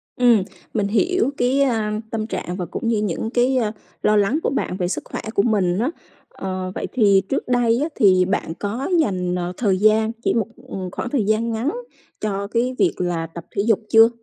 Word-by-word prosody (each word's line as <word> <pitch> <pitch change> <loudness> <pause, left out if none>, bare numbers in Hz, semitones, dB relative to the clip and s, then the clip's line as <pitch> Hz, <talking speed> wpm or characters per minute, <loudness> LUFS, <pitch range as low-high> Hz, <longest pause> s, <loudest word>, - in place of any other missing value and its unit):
Ừm, 240 -6 +4 0.3
mình 205 -2 +1
hiểu 275 - +2
cái, 255 +3 +2
a, 220 -5 +1
tâm 220 -1 -2
trạng 180 -5 -4
và 180 - -3
cũng 200 - -4
như 230 -1 +2
những 210 +2 -2
cái, 250 +3 +2
ơ, 220 -4 +1 0.3
lo 210 - +4
lắng 205 +9 +2
của - - +2
bạn 255 -8 -2
về 180 -2 -1
sức 180 - -3
khỏe - - -5
của 200 - +3
mình 195 -5 +1
á. 245 +5 +1 0.4
Ờ, 185 -1 -4
vậy - - -3
thì 200 -6 +5
trước 275 - -1
đây 240 -1 +2
á 315 - -1
thì 185 -3 +5
bạn 190 -3 -1
có 225 - -3
dành, 180 - 0
ờ, 180 0 -3
thời 200 -6 +2
gian 215 +2 +3
chỉ - - +2
một, 225 -2 0 0.2
ừm, 185 -2 -5
khoảng 245 - -4
thời 250 -4 +1
gian 220 +2 +1
ngắn 225 +5 -1 0.5
cho 200 -1 -2
cái 240 +4 0
việc 370 - +3
là 175 -2 -1
tập 165 +1 -10
thể - - +2
dục 225 -3 +4
chưa? 225 0 +7
215 Hz, 215 wpm, -21 LUFS, 190-240 Hz, 0.5 s, chưa